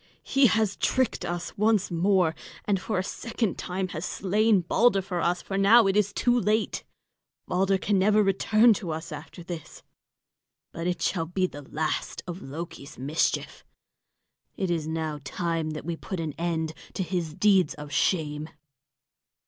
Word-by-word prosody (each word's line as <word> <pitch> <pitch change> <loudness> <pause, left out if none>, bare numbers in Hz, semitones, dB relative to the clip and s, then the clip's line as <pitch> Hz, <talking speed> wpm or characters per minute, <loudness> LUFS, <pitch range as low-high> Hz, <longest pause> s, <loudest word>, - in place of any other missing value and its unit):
He 270 -1 +4
has 220 -3 +1
tricked 260 -3 +1
us 175 0 -4
once 210 -3 +2
more, 180 -1 +3 0.3
and 195 -3 +1
for 210 +2 -2
a 185 - +1
second 225 0 -3
time 185 +1 -3
has 165 -2 -5
slain 205 +2 +2
Balder 200 +5 +3
for 180 -2 -3
us; 175 +1 0
for - - -7
it 195 +1 +5
is 210 -2 +4
now - - -17
too 245 0 +3
late, 215 0 0 0.6
Balder 195 +2 +2
can 200 +1 +1
never 210 +2 +4
return 215 +4 +4
to 190 -3 -5
us 160 +1 -4
after 155 +4 -8
this. 170 -2 -8 0.9
But 165 +1 -4
it 180 - -1
shall 165 -4 0
be 185 +2 0
the 145 -5 -6
last 155 0 -2
of 180 +1 -6
Loki's 155 0 -8
mischief. 140 +5 -1 0.9
It 190 -2 -1
is 160 -3 -1
now 160 -2 -3
time 165 +2 -2
that 155 -1 -6
we 170 0 -2
put 185 +2 -6
an 160 -3 -3
end 165 -2 -2 0.2
to 190 - 0
his 170 -3 -3
deeds 195 -6 +3
of 150 -1 -9
shame." 150 0 0
180 Hz, 165 wpm, -27 LUFS, 160-200 Hz, 0.9 s, it